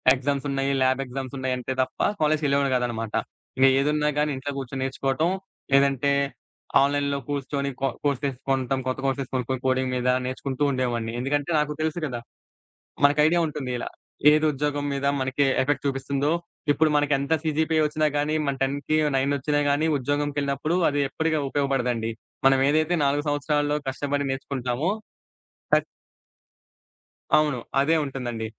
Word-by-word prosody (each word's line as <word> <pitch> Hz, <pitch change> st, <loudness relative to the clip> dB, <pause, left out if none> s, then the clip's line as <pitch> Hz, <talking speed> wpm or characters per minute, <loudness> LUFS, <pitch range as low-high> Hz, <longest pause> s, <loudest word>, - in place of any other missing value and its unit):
ఎగ్జామ్సున్నయి, 140 Hz, 0 st, -1 dB
lab 130 Hz, +1 st, +3 dB
ఎగ్జామ్సున్నాయంటే 130 Hz, -1 st, -3 dB
తప్ప, -, -, -10 dB, 0.2 s
కాలేజీకెళ్ళేవాడిని 140 Hz, -3 st, +2 dB
గాదనమాట. 115 Hz, -3 st, -3 dB, 0.7 s
ఏదున్నా 150 Hz, +1 st, +1 dB
గానీ 150 Hz, 0 st, +2 dB
ఇంట్లో 135 Hz, +2 st, -4 dB
గూర్చొని 135 Hz, 0 st, -4 dB
నేర్చుకోటం, 135 Hz, +4 st, 0 dB, 0.4 s
లేదంటే, 140 Hz, 0 st, +3 dB, 0.7 s
ఆన్‌లైన్‌లో 140 Hz, 0 st, +1 dB
కూర్చొని 140 Hz, 0 st, -2 dB
కో 135 Hz, -, +2 dB, 0.2 s
కోర్సెస్ 140 Hz, -1 st, 0 dB
కొంటం, 135 Hz, 0 st, +1 dB
కొత్త 130 Hz, +1 st, -1 dB
కోర్సెస్ 135 Hz, -1 st, -1 dB
కొనుక్కొని 130 Hz, 0 st, -1 dB
కోడింగ్ 130 Hz, 0 st, +1 dB
మీద, 125 Hz, 0 st, 0 dB, 0.2 s
నేర్చుకుంటూ 130 Hz, +2 st, -3 dB
ఉండేవాడిని. 120 Hz, -3 st, -1 dB
ఎందుకంటే, 145 Hz, +4 st, -1 dB
నాకు 150 Hz, 0 st, 0 dB
తెలుసు 160 Hz, +2 st, -1 dB
గదా! 120 Hz, -4 st, -4 dB, 0.8 s
మనకైడియా 150 Hz, +4 st, +5 dB
ఉంటుంది 145 Hz, -4 st, -4 dB
ఇలా. -, -, -4 dB, 0.4 s
ఏది, 155 Hz, +1 st, +3 dB
ఉద్యోగం 145 Hz, 0 st, -2 dB
మీద 140 Hz, 0 st, -2 dB, 0.2 s
మనకీ 130 Hz, +2 st, +1 dB, 0.2 s
ఎఫెక్ట్ 145 Hz, +1 st, -1 dB
చూపిస్తుందో, 140 Hz, +2 st, -1 dB, 0.4 s
ఇప్పుడు 155 Hz, +1 st, +3 dB
మనకెంత 145 Hz, +1 st, +1 dB
సీజీపీ 160 Hz, +1 st, +1 dB
ఒచ్చినా 155 Hz, +1 st, +1 dB
గానీ, 150 Hz, +1 st, 0 dB
మన 140 Hz, -, 0 dB
10కి 140 Hz, +3 st, 0 dB, 0.2 s
నైనొచ్చినా 140 Hz, +2 st, +1 dB
గానీ, 145 Hz, +3 st, +2 dB
ఉద్యోగం‌కెళ్ళినప్పుడు 145 Hz, +3 st, -1 dB
అది 145 Hz, 0 st, 0 dB
ఎప్పటిక 160 Hz, +3 st, 0 dB
ఉపయోగపడదండి. 125 Hz, -5 st, 0 dB, 0.4 s
మనం 135 Hz, 0 st, +4 dB
ఏదైతే 155 Hz, +3 st, +2 dB
4 145 Hz, +2 st, +1 dB
సంవత్సరాలలో 145 Hz, 0 st, 0 dB
కష్టపడి 140 Hz, +1 st, -2 dB
నేర్చుకుంటామో 135 Hz, +4 st, -2 dB, 0.8 s
టక్ -, -, +5 dB, 1.5 s
అవును. 150 Hz, -4 st, +2 dB, 0.2 s
అదే 160 Hz, +4 st, +3 dB
ఉంటుందండి. 120 Hz, -4 st, -4 dB
140 Hz, 125 wpm, -25 LUFS, 130-145 Hz, 1.5 s, మనకైడియా